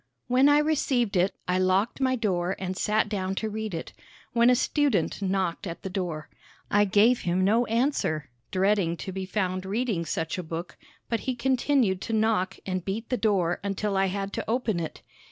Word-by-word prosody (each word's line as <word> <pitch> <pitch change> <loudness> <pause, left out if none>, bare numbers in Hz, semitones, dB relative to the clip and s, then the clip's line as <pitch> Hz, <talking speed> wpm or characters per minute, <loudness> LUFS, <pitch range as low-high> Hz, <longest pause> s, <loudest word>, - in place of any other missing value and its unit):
When 255 +3 +4
I 290 - +6
received 275 -8 +1
it, 180 +2 +2
I 180 +1 +1
locked 190 +7 +1
my 260 -1 +2
door 190 -6 0
and 185 0 -4
sat 215 +3 +1
down 195 -2 -2
to 220 +2 -2
read 215 -3 -4
it, 165 - -6 0.4
when 235 +1 +5
a 250 - +6
student 245 - +1
knocked 190 -2 -1
at 170 - -7
the 190 - -4
door. 175 -5 -3 0.4
I 205 0 +5
gave 210 +5 +4
him 180 +2 +1
no 225 +5 +3
answer, 220 - 0 0.2
dreading 190 -3 +1
to 190 - -6
be 190 0 -5
found 185 -2 -1
reading 205 -2 -1
such 160 +3 -2
a - - -3
book, 165 +2 -6 0.3
but 230 - -1
he 255 - 0
continued 250 -5 +1
to 225 - -4
knock 215 -3 +1
and 185 -2 -2
beat 210 +5 -4
the 250 - +1
door 190 -7 +1
until 200 0 -1
I 195 0 +3
had 195 +1 -3
to - - -4
open 230 -5 0
it. 160 - -6
200 Hz, 190 wpm, -27 LUFS, 185-230 Hz, 0.4 s, I